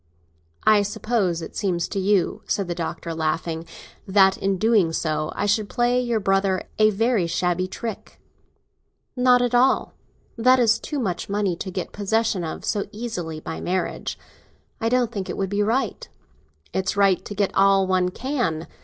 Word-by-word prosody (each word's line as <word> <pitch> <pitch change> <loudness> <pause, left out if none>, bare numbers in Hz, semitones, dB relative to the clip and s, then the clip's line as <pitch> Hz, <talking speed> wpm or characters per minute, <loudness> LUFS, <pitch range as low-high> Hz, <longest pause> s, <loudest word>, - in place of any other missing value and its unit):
"I 215 -1 +6
suppose 200 -4 -1
it - - -9
seems 180 -5 -1
to 200 - -2
you," 195 -1 +1
said 200 -3 -1
the 175 - -2
Doctor, 170 0 -4
laughing, 160 +1 -2 0.4
"that 190 -1 +5
in 195 0 0
so - - -3
doing 165 -7 +1
I - - -1
should 205 0 +1
play 245 +1 +2
your 240 -2 0
brother 195 -1 +1 0.2
a 215 0 +6
very 215 -3 +1
shabby 180 +2 0
trick." 225 +3 -7 1.0
"Not 250 -1 +4
at 245 0 -1
all. 250 +2 +3 0.5
That 255 +3 +5
is 230 -2 +4
too 300 - -5
much 195 -10 -2
money 200 -3 0
to 190 - -5
get 185 -1 -4
possession 210 -2 0
of 160 - -5
so 205 - -1
easily, 195 -9 -5
by 160 - -6
marrying. 185 +1 -2 0.7
I 225 -2 0
don't 245 -1 +1
think 200 -5 -5
it - - -4
would 195 -1 -2
be 205 +1 +1
right." 230 +6 -1 0.6
"It's 190 +1 -1
right 195 -3 +3
to 205 - -7
get 200 -1 0
all 195 0 +4
one 185 -1 +1
can. 205 - -2
195 Hz, 170 wpm, -23 LUFS, 180-225 Hz, 1.0 s, I